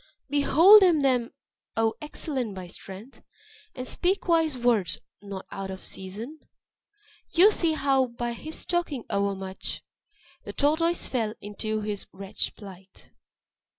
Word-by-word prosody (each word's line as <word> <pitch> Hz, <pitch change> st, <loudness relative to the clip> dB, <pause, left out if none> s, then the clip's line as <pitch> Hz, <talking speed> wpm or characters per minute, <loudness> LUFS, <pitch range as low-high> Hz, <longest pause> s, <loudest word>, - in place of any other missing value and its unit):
"Behold 325 Hz, +9 st, +7 dB
him 345 Hz, -6 st, +5 dB
then, 250 Hz, -3 st, +2 dB, 0.5 s
O 225 Hz, 0 st, +2 dB
excellent 265 Hz, -7 st, -3 dB
by 185 Hz, -1 st, -6 dB
strength! 195 Hz, +7 st, -11 dB, 0.5 s
And 255 Hz, -, -5 dB
speak 375 Hz, +2 st, 0 dB
wise 325 Hz, -5 st, +2 dB
words, 230 Hz, -9 st, +2 dB, 0.2 s
not 200 Hz, -2 st, -7 dB
out 195 Hz, 0 st, -5 dB
of 190 Hz, 0 st, -8 dB
season. 215 Hz, +11 st, -7 dB, 0.9 s
You 380 Hz, +5 st, +6 dB
see 335 Hz, -5 st, +1 dB
how, 270 Hz, -3 st, +2 dB
by 240 Hz, 0 st, -4 dB
his 310 Hz, +6 st, -4 dB
talking 335 Hz, -8 st, -1 dB
overmuch, 195 Hz, -1 st, -2 dB, 0.6 s
The -, -, -7 dB
tortoise 330 Hz, +4 st, +2 dB
fell 225 Hz, -4 st, -1 dB
into 215 Hz, +1 st, -3 dB
this 205 Hz, -1 st, -4 dB
wretched 195 Hz, +2 st, -4 dB
plight!" 195 Hz, -2 st, -14 dB
240 Hz, 125 wpm, -27 LUFS, 200-310 Hz, 0.9 s, Behold